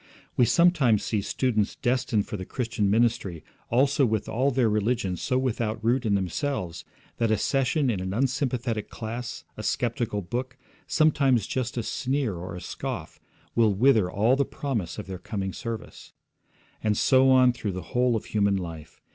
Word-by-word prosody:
We 125 - +5
sometimes 150 - +4
see 105 -3 0
students 110 0 0
destined 120 -4 0
for - - -6
the 95 - -5
Christian 110 -2 -1
ministry 105 -7 +1 0.3
also 135 +4 +3
with 110 -4 0
all 130 +5 +1
their 130 -3 +2
religion 105 -3 0
so 125 +8 -1
without 115 -4 -1
root 120 0 +2
in 100 - +3
themselves 95 - -2 0.3
that 115 -1 +1
a 110 - +3
session 135 +4 +1
in 100 - -2
an 95 0 -3
unsympathetic 125 -1 -1
class, 120 +2 -6
a - - -5
sceptical 115 -3 -1
book, 125 +7 -4 0.3
sometimes 140 - +3
just 125 -2 -3
a 120 - 0
sneer 130 -1 -1
or 90 +1 -6
a 90 - -7
scoff, - - -6 0.3
will 110 -4 +3
wither 110 -4 +4
all 110 +7 +3
the 140 - +2
promise 115 - -3
of 105 - -5
their 95 -1 -7
coming 95 -2 -4
service. 115 -1 -7 0.7
And 105 -1 +1
so 130 0 +5
on 130 -1 +6
through 110 -4 -4
the 95 - -7
whole 125 -1 +3
of 110 - -3
human 100 -2 +1
life. 85 -5 -7
115 Hz, 170 wpm, -26 LUFS, 100-130 Hz, 0.7 s, on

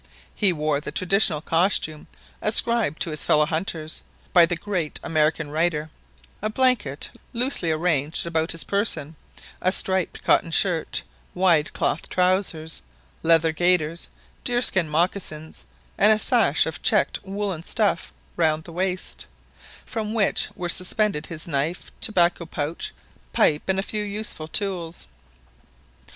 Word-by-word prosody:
He 205 -3 +3
wore 150 -3 -1
the - - -6
traditional 185 -4 +3
costume 165 -2 +1 0.3
ascribed 220 -6 +2
to 165 - -3
his 155 - -3
fellow 150 0 +4
hunters 160 -1 -3 0.3
by 175 -2 +7
the 175 - -1
great 175 -4 -3
American 155 -1 0
writer; 155 -1 -1 0.5
a 215 - -1
blanket 220 - +1 0.2
loosely 240 -7 +1
arranged 155 -2 0
about 165 -1 +1
his 165 - -1
person, 165 -7 -1 0.5
a 185 - +2
striped 190 -2 +1
cotton 170 - +3
shirt, 165 -1 +1 0.3
wide 170 -5 +3
cloth 160 - -1
trousers, 180 -3 0 0.4
leather 165 0 +4
gaiters, 170 -1 +1 0.4
deerskin 240 -9 +2
mocassins, 160 - -2 0.3
and 210 +2 +6
a 215 - +4
sash - - +3
of - - -5
checked - - +2
woollen 195 -3 -3
stuff 70 - 0 0.2
round 155 0 +1
the 170 - -11
waist, 185 +1 -3 0.6
from 220 -1 -4
which 210 -3 +2
were 175 - -3
suspended 185 -1 0
his 160 -1 -4
knife, 155 +3 -2
tobacco 175 -5 +2
pouch, 155 +1 -3 0.4
pipe, 150 0 +3
and 190 0 +1
a 195 - 0
few 210 +1 -3
useful 205 -6 -4
tools. 175 -2 -2
170 Hz, 130 wpm, -24 LUFS, 155-195 Hz, 0.6 s, by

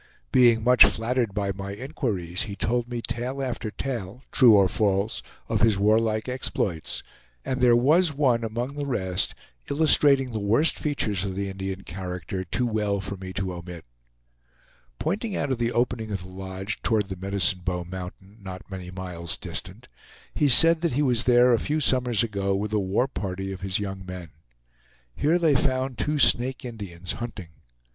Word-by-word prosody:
Being 120 -3 +5
much 125 -1 +8
flattered 115 +3 +1
by 100 -2 0
my 100 +1 -6
inquiries 100 - -3
he 100 - -5
told 120 +3 -1
me 120 -1 -4
tale 125 +3 -2
after 125 -4 -3
tale, 120 -1 -5
true 120 -5 +7
or 100 -2 +5
false, 100 +2 0 0.3
of - - -1
his 110 -3 +4
warlike 110 +2 +2
exploits; 100 -9 -2 0.4
and 130 0 -2
there 120 -1 +6
was 155 +8 +4
one 130 -5 +1
among 120 +4 -3
the 145 0 -4
rest 95 -8 -1 0.3
illustrating 140 -3 +4
the 110 - -3
worst 115 +10 +2
features 110 - -1
of 95 -2 -3
the 100 0 -2
Indian 95 0 -5
character 90 0 -5
too 125 +6 -1
well 105 -3 0
for 100 +1 -5
me 95 -1 -8
to 95 -1 -3
omit. 85 -1 -9 1.1
Pointing 200 +4 -2
out 145 - -1
of 130 - -1
the 120 0 0
opening 120 -2 -1
of 100 -3 -3
the 90 - -11
lodge 95 +2 -5
toward 110 -3 +1
the 95 - -4
Medicine 95 0 +1
Bow 90 -1 -2
Mountain, 95 +3 -9
not 95 0 -9
many 90 -2 -6
miles 90 -2 -6
distant - - -6 0.5
he 145 - +2
said 165 +5 +6
that 170 -5 0
he 145 +4 +1
was 120 -4 +1
there 125 0 +5
a 115 - +3
few 150 +1 -1
summers 125 -5 +2
ago 100 -3 -1
with 105 +2 -3
a 105 - +2
war 100 +6 +1
party 95 -4 -4
of 95 -1 -7
his 95 -1 0
young 95 -2 -5
men. 90 -3 -8 0.8
Here 160 +4 +2
they 165 -4 +3
found 130 -1 0
two 150 0 0
Snake 130 -2 +2
Indians, 95 -7 -6
hunting. 110 -8 -6
110 Hz, 175 wpm, -25 LUFS, 95-125 Hz, 1.1 s, much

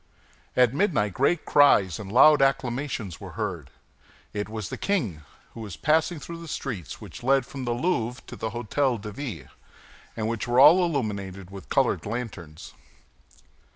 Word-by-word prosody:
At 125 -1 +5
midnight 140 - +1
great 145 - +1
cries 100 - +4
and 100 -2 -7
loud 150 +5 +7
acclamations 130 - -1
were 95 -2 -9
heard. 90 -11 -4 0.6
It 105 0 -3
was 110 -4 -5
the - - -5
king, 115 - -1 0.3
who - - -10
was 100 -6 -7
passing 160 +2 +1
through 170 +4 -8
the 165 - -9
streets 115 - -5
which - - -10
led 135 +1 +2
from 135 0 -7
the 120 - 0
Louvre 125 -3 -1
to - - -9
the 110 - -4
Hôtel 120 +2 -1
de 105 +1 -7
Ville, 100 - -6 0.7
and 110 -1 -1
which 115 0 -3
were 120 +1 +2
all 170 +7 +8
illuminated 100 - -3
with 95 -1 -10
colored - - +1
lanterns. 100 -9 -6
120 Hz, 160 wpm, -26 LUFS, 100-140 Hz, 0.7 s, all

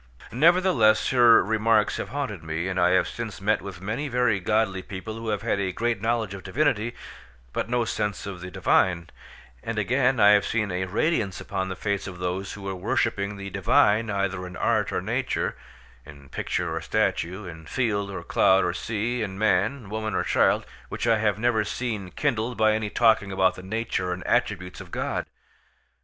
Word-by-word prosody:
Nevertheless, 155 - +4
her 120 -4 +6
remarks 110 +1 +2
have - - -4
haunted 135 - -4
me, 80 +2 -3
and 95 0 -2
I 90 0 +4
have 95 - +3
since 110 -4 -6
met 105 +2 +1
with 95 -3 -8
many 115 +10 -3
very 125 -6 +1
godly 100 -1 0
people 100 +3 -7
who 115 0 -5
have 105 -1 -2
had 115 -3 0
a 95 -1 -1
great 115 +2 -1
knowledge 115 -3 0
of 100 - -7
divinity, 120 +2 0 0.6
but - - -2
no 120 -1 +1
sense 105 -3 -2
of 95 -3 -7
the 90 - -6
divine: 90 -1 +1 0.5
and 115 -1 -4
again, 125 +5 +2
I 105 - +7
have 105 -1 +5
seen 105 -3 -1
a 90 +1 -1
radiance 105 - 0
upon 95 -1 -3
the 95 - -4
face 100 +1 -2
of 90 -2 -8
those 90 +2 -3
who 100 - -9
were 95 0 -3
worshipping 100 0 -1
the 100 0 -7
divine 110 +2 +3
either 100 -2 -2
in 90 0 -9
art - - +1
or - - -2
nature—in 70 -1 -5
picture - - -2
or - - -3
statue—in 85 -2 -2
field 105 -5 -1
or 100 - -6
cloud 95 0 +3
or 90 - 0
sea—in 110 0 -3
man, 110 +4 +1
woman, 110 +1 -3
or - - +1
child—which - - 0
I 115 -2 +3
have 105 -2 +1
never 110 -1 +2
seen 105 -3 -4
kindled 120 -1 -1
by 110 0 +4
any 110 -1 -1
talking 110 -3 +3
about 95 -1 +2
the 95 - -10
nature 95 -2 -2
and 90 - -7
attributes 100 -7 -1
of - - -11
God. - - -3
105 Hz, 180 wpm, -25 LUFS, 95-115 Hz, 0.6 s, I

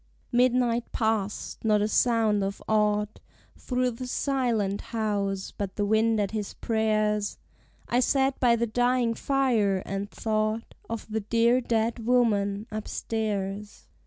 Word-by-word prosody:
Midnight 245 -1 +2
past! 220 -3 -2
Not 215 -2 +3
a - - +1
sound 220 -2 +2
of 195 +1 -3
aught 210 -1 +1 0.4
Through 250 -1 -1
the 250 +2 -7
silent 240 -7 0
house, 200 -4 -2
but 195 -2 -4
the 205 - 0
wind 220 +1 +2
at 200 -2 0
his 215 -2 -4
prayers. 215 -2 0 0.5
I 240 - +2
sat 270 +1 +2
by 240 -2 +4
the 235 0 0
dying 245 +1 +1
fire, 230 -8 +1
and 195 +1 -4
thought 215 +1 -2 0.2
Of 230 -1 -5
the 220 - 0
dear 230 +4 +2
dead 230 -1 -1
woman 210 -4 +2
upstairs. 210 -1 -4
220 Hz, 130 wpm, -27 LUFS, 210-240 Hz, 0.5 s, by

